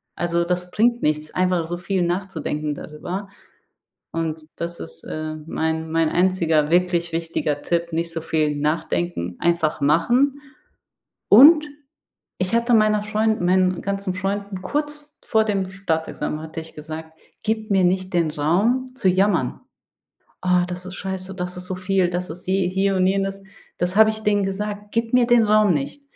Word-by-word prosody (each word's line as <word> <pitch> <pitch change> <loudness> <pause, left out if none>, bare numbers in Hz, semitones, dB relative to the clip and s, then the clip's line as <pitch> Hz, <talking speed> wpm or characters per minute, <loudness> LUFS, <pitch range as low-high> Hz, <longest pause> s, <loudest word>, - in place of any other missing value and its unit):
Also 170 0 0
das 180 0 -2
bringt 240 +2 +2
nichts, 150 0 0
einfach 180 -2 +1
so 175 +1 -3
viel 185 +1 -1
nachzudenken 170 -4 -2
darüber. 175 +7 -6 0.8
Und 160 -1 -3
das 170 0 -5
ist, - - -10
äh, 155 0 -5
mein 160 0 -2
mein 165 -1 +2
einziger 170 -4 +2
wirklich 175 0 +1
wichtiger 165 -3 -2
Tipp: 170 0 -1
Nicht 165 +1 -2
so 165 - -3
viel 155 -2 0
nachdenken, 150 - -2
einfach 170 -2 +1
machen. 240 - +3 0.9
Und 305 +8 +9 0.7
ich 185 +4 -1
hatte 235 +1 +2
meiner 215 -1 +4
Freund 215 0 0
meinen 185 0 +2
ganzen 200 -1 -2
Freunden, 195 +1 -3
kurz 295 +6 -4
vor 220 -1 +2
dem 200 -3 -1
Staatsexamen 165 -4 -3
hatte 160 0 -6
ich 160 - -14
gesagt: 160 +1 -8 0.3
„Gib 220 0 -1
mir 190 -2 +3
nicht 185 +1 0
den 170 -3 +2
Raum 215 - +1
zu 190 -8 +2
jammern. 185 -7 +1 0.8
Oh, 180 -1 +3
das 180 0 -6
ist 185 - -7
scheiße, 190 -1 -5
das 180 -1 -4
ist 180 - -6
so 185 - -3
viel, 185 0 +1
das 180 0 -3
ist 180 +3 -9
je 190 0 +1
hier 190 +1 +1
und 185 0 +3
jenes.“ 195 0 -1 0.3
Das 180 +2 -1
habe 220 0 +7
ich 220 0 -6
denen 205 -1 +2
gesagt: 205 +1 -4
„Gib 230 0 -1
mir 250 -1 +4
den 240 -1 +5
Raum 210 -2 +4
nicht. 145 - -4
185 Hz, 165 wpm, -22 LUFS, 165-205 Hz, 0.9 s, Und